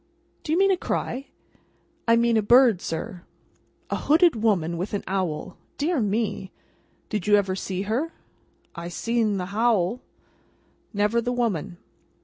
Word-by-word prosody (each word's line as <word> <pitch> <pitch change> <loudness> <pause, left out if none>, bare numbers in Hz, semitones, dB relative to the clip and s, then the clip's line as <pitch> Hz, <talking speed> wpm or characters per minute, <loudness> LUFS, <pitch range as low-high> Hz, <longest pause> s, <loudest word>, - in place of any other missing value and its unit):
"Do 300 - -5
you 325 - +3
mean 390 +1 +4
a 375 - +2
cry?" 270 -5 -3 0.8
"I 230 - +6
mean 235 0 +3
a 220 - +4
bird, 235 -2 +5
sir." 165 +2 -5 0.7
"A - - +1
hooded 325 +1 +4
woman 195 -7 +1
with 185 +5 -3
an 200 - -3
owl. 185 -5 -3 0.2
Dear 310 +1 0
me! 210 -2 -1 0.6
Did 210 -4 -3
you 205 - +6
ever 195 -2 +1
see 190 0 -3
her?" 245 +11 -1 0.6
"I 170 0 -6
seen 225 +1 0
the 180 - -2
howl." 225 0 +1 0.9
"Never 210 +3 +1
the 245 - -2
woman?" 220 -9 -1
215 Hz, 145 wpm, -25 LUFS, 190-240 Hz, 0.9 s, I